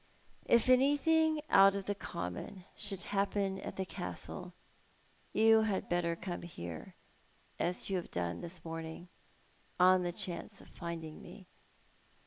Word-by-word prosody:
If 235 Hz, 0 st, +5 dB
anything 300 Hz, +4 st, +4 dB
out 195 Hz, 0 st, +7 dB
of 200 Hz, -1 st, -3 dB
the 205 Hz, -, 0 dB
common 180 Hz, -, -6 dB
should 200 Hz, -3 st, -3 dB
happen 195 Hz, -1 st, 0 dB
at -, -, -6 dB
the 190 Hz, -, -2 dB
Castle 180 Hz, 0 st, -5 dB, 0.8 s
you 220 Hz, 0 st, +6 dB
had 210 Hz, -3 st, -1 dB
better 175 Hz, -1 st, +1 dB
come 175 Hz, +1 st, -5 dB
here, 85 Hz, -, -8 dB, 0.6 s
as 180 Hz, +1 st, 0 dB
you 195 Hz, -, 0 dB
have 175 Hz, -, -5 dB
done 85 Hz, -1 st, -2 dB
this 170 Hz, +1 st, -6 dB
morning, 165 Hz, +1 st, -6 dB, 0.7 s
on 185 Hz, 0 st, +6 dB
the 175 Hz, -1 st, -1 dB
chance 185 Hz, +3 st, -4 dB
of -, -, -15 dB
finding 165 Hz, -2 st, -6 dB
me. 185 Hz, +2 st, -12 dB
185 Hz, 135 wpm, -34 LUFS, 170-205 Hz, 0.8 s, out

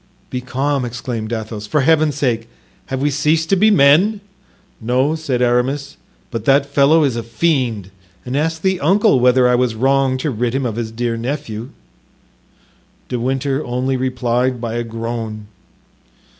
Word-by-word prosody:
"Be 125 Hz, -, -3 dB
calm," 135 Hz, +2 st, -1 dB
exclaimed 120 Hz, -2 st, -5 dB
Athos, 110 Hz, -2 st, -5 dB
"for 145 Hz, +8 st, +1 dB
Heaven's 155 Hz, 0 st, +3 dB
sake! 115 Hz, -5 st, -1 dB, 0.4 s
have 130 Hz, 0 st, -3 dB
we 145 Hz, -, +2 dB
ceased 155 Hz, +3 st, +1 dB
to 195 Hz, -, +4 dB
be 210 Hz, +3 st, +4 dB
men?" 190 Hz, +4 st, +4 dB, 0.6 s
"No," 125 Hz, +6 st, +1 dB
said 140 Hz, -6 st, -1 dB
Aramis, 130 Hz, +4 st, 0 dB, 0.4 s
"but 115 Hz, -3 st, -4 dB
that 140 Hz, +1 st, +4 dB
fellow 140 Hz, +3 st, +3 dB
is 135 Hz, -5 st, +1 dB
a 120 Hz, -, -2 dB
fiend; 115 Hz, -, -1 dB, 0.3 s
and 125 Hz, +1 st, -4 dB
ask 160 Hz, +2 st, -1 dB
the 190 Hz, -1 st, +1 dB
uncle 195 Hz, -, +3 dB
whether 125 Hz, 0 st, +4 dB
I 125 Hz, -, +3 dB
was 125 Hz, -2 st, +1 dB
wrong 135 Hz, +2 st, +2 dB
to 140 Hz, +3 st, -2 dB
rid 120 Hz, +1 st, -2 dB
him 135 Hz, -1 st, -1 dB
of 115 Hz, -3 st, -2 dB
his 115 Hz, -1 st, -3 dB
dear 115 Hz, 0 st, -2 dB
nephew." 120 Hz, -2 st, -4 dB, 1.4 s
De 125 Hz, -, -2 dB
Winter 135 Hz, +3 st, -1 dB
only 125 Hz, +2 st, -1 dB
replied 125 Hz, -1 st, 0 dB
by 115 Hz, -1 st, -4 dB
a 120 Hz, 0 st, -2 dB
groan. 115 Hz, -2 st, -5 dB
130 Hz, 160 wpm, -18 LUFS, 120-145 Hz, 1.4 s, to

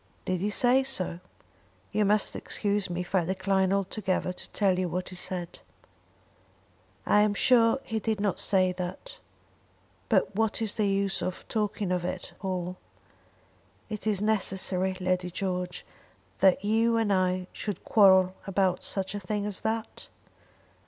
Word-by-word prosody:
"Did 185 Hz, -1 st, -1 dB
he 205 Hz, -, 0 dB
say 245 Hz, +5 st, +4 dB
so?" 185 Hz, -10 st, -3 dB, 0.7 s
"You 210 Hz, 0 st, +2 dB
must 210 Hz, 0 st, +2 dB
excuse 205 Hz, -2 st, -1 dB
me 175 Hz, 0 st, -2 dB
if 180 Hz, -, -9 dB
I 185 Hz, -3 st, +3 dB
decline 190 Hz, +1 st, +1 dB
altogether 195 Hz, -1 st, -1 dB
to -, -, -11 dB
tell 190 Hz, -3 st, +1 dB
you 185 Hz, -1 st, -1 dB
what 180 Hz, +2 st, -3 dB
he 185 Hz, -, -8 dB
said." 175 Hz, -1 st, -4 dB, 1.5 s
"I 210 Hz, -, +4 dB
am 210 Hz, -1 st, +2 dB
sure 235 Hz, +2 st, +4 dB
he 225 Hz, -1 st, -3 dB
did 220 Hz, -1 st, -1 dB
not 205 Hz, -1 st, 0 dB
say 185 Hz, -2 st, +3 dB
that. 180 Hz, -, -6 dB, 0.9 s
But -, -, +2 dB
what 220 Hz, 0 st, 0 dB
is 220 Hz, -2 st, -1 dB
the 210 Hz, -2 st, 0 dB
use 195 Hz, 0 st, 0 dB
of 185 Hz, -, -4 dB
talking 210 Hz, -3 st, -1 dB
of 180 Hz, -1 st, 0 dB
it 175 Hz, -, -5 dB
all. 180 Hz, -2 st, -3 dB, 1.1 s
Is 215 Hz, 0 st, -4 dB
it 210 Hz, -1 st, +2 dB
necessary, 190 Hz, -3 st, +1 dB
Lady 185 Hz, -1 st, 0 dB
George, 180 Hz, -1 st, -3 dB, 0.5 s
that 190 Hz, +1 st, +4 dB
you 225 Hz, +2 st, +2 dB
and 220 Hz, -3 st, +2 dB
I 185 Hz, -1 st, +1 dB
should 205 Hz, -2 st, -5 dB
quarrel 190 Hz, -3 st, +5 dB
about 190 Hz, -2 st, +1 dB
such 190 Hz, 0 st, -2 dB
a 205 Hz, -, -3 dB
thing 205 Hz, +2 st, -3 dB
as 205 Hz, -2 st, -2 dB
that?" 220 Hz, 0 st, -3 dB
195 Hz, 150 wpm, -28 LUFS, 185-210 Hz, 1.5 s, quarrel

